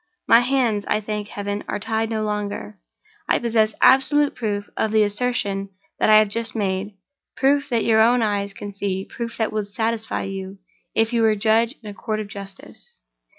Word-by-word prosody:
My 230 - +7
hands, 245 -5 +1
I - - +1
thank 210 -1 -4
Heaven, 205 0 -4
are - - -2
tied 220 +1 -2
no 220 -1 -1
longer. 205 - -4 0.5
I - - +4
possess 220 -2 +1
absolute 290 +2 +5
proof 205 -3 -3
of 220 - 0
the 215 -1 +4
assertion 205 -2 -1 0.3
that - - +3
I 215 - +8
have 215 0 +5
just 230 +2 -2
made—proof 215 +8 -2
that 235 -3 0
your 220 -1 +4
own 240 +1 +4
eyes 200 -2 -1
can 200 +1 -8
see—proof 200 +4 -4
that 220 -2 -1
would 210 -2 -2
satisfy 225 +1 -2
you, 195 0 -6 0.4
if 225 +1 +2
you 235 - +2
were 220 -1 +4
judge 225 +4 +2
in - - -9
a 205 - -6
Court 215 +1 -3
of 210 -1 -5
Justice. 195 -1 -9
215 Hz, 180 wpm, -22 LUFS, 205-230 Hz, 0.5 s, I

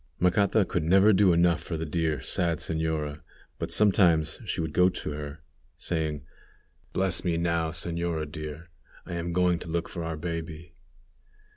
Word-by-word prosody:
Macata 90 +3 +3
could - - -1
never 95 +6 +5
do 95 -1 +5
enough 85 -1 +3
for 85 0 -4
the 80 - -3
dear, 80 -1 -1
sad 85 -4 0
señora, 80 -2 -2 0.4
but - - -3
sometimes 85 -7 +4
she - - -3
would 80 -2 -2
go 90 +1 +5
to 90 - -5
her, 75 0 -7 0.3
saying, 80 -3 -2 0.7
"Bless 95 -3 +1
me 85 -2 0
now, 85 -1 0
señora 85 -1 -2
dear; 75 +2 -8 0.3
I - - -7
am 85 0 -3
going 90 0 +2
to 85 - -8
look 85 +1 -1
for 85 - -6
our 80 -1 -4
baby." 80 0 -6
85 Hz, 160 wpm, -27 LUFS, 80-90 Hz, 0.7 s, never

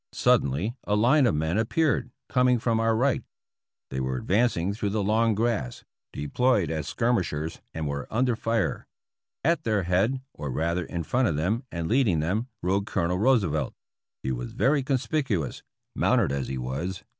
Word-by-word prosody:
Suddenly 75 - +2
a 105 - 0
line 125 +6 +4
of 95 - +1
men 80 +6 0
appeared 125 +1 +1 0.2
coming 125 -1 +3
from 115 -1 0
our 115 0 +2
right. 130 +3 +2 0.7
They 65 - -2
were 65 0 -1
advancing 100 - +1
through 105 -1 -2
the 105 0 -1
long 110 +2 +2
grass, 110 - -1 0.3
de 75 - -5
ployed 125 - +2
as 80 -3 -3
skirmishers 90 -10 -1
and 80 -2 -3
were 70 0 -4
under 125 +1 +1
fire. 115 -1 -1 0.6
At 170 +1 +2
their 105 -4 +1
head, 95 +9 +1
or 75 - -5
rather 85 +6 -1
in 85 +1 -4
front 125 +9 +1
of 80 - 0
them 105 - 0
and 85 -1 -3
leading 110 - +3
them, 100 +10 -1 0.2
rode 100 +3 +1
Colonel 90 +2 0
Roosevelt. 100 - +2 0.5
He 65 - -1
was - - -4
very 140 +1 +2
conspicuous, 130 - -1 0.3
mounted - - +2
as 70 -1 -2
he 65 - -3
was. 70 +10 -4
100 Hz, 170 wpm, -26 LUFS, 80-120 Hz, 0.7 s, line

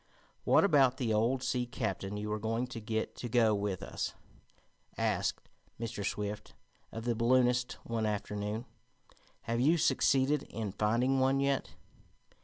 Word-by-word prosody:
"What - - +5
about 135 -9 +4
the 115 -4 0
old 120 +5 +1
sea 125 -1 0
captain 100 -3 -3
you 105 +1 -4
were 105 0 -1
going 115 +3 -1
to 125 -2 -7
get 110 0 -2
to 120 - -5
go 115 -2 +4
with 100 -2 -2
us?" - - -4 0.8
asked - - -1 0.3
Mr. 115 -3 -4
Swift 105 +1 -4 0.4
of 115 +1 -6
the 120 - +2
balloonist 120 +1 +2
one 115 -2 -1
afternoon. 105 +2 -3 0.8
"Have 115 0 -2
you 155 +7 +4
succeeded 140 -1 +3
in 110 -3 -4
finding 115 +6 +1
one 135 +1 +3
yet?" 140 -1 0
115 Hz, 145 wpm, -32 LUFS, 105-130 Hz, 0.8 s, What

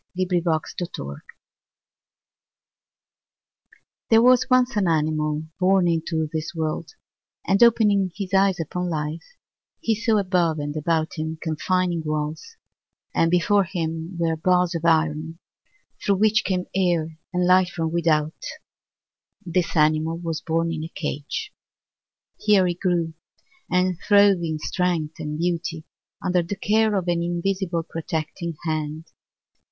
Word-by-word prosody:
A - - 0
Life 180 -2 +1
FableKate 160 -3 -1 0.2
Chopin 70 +1 -6 2.9
There 225 0 +6
was 255 +1 +5
once 255 -1 +3
an 200 -3 +2
animal 155 -1 0 0.2
born 185 -1 +3
into 160 -1 0
this 160 +2 -4
world, 160 +1 -3 0.5
and 195 +2 +2
opening 210 -5 +4
his 195 -2 -5
eyes 195 -1 +3
upon 180 +3 -3
Life, 155 0 -3 0.6
he 225 - +1
saw 220 0 +1
above 180 -5 +1
and 145 0 -4
about 160 +1 -1
him 160 +1 -3
confining 170 +2 0
walls, 155 - -4 0.6
and 165 - +3
before 195 +4 +3
him 165 0 -4
were 165 -1 +1
bars 180 +2 +2
of 165 -1 -3
iron 160 0 +1 0.7
through 200 - +3
which 215 +2 +3
came 185 -2 -1
air 170 -4 0
and 180 0 +1
light 185 0 +5
from 165 -3 -3
without; 160 -2 0 1.0
this 175 0 -1
animal 155 +2 +2
was 165 -2 -4
born 165 +1 0
in 160 -1 -4
a 160 - -6
cage. 155 - -5 0.9
Here 210 -3 +4
he 175 - +1
grew, 175 -2 -1 0.6
and 180 -1 +1
throve 200 -2 +5
in 160 -2 -2
strength 165 -2 -2
and 150 -1 -4
beauty 170 -1 -2 0.4
under 180 -1 +2
the 175 +4 -4
care 215 +2 +2
of 185 -2 -1
an 170 -1 +1
invisible 175 0 -1
protecting 165 0 -4
hand. 155 -1 -3
170 Hz, 135 wpm, -23 LUFS, 160-185 Hz, 2.9 s, There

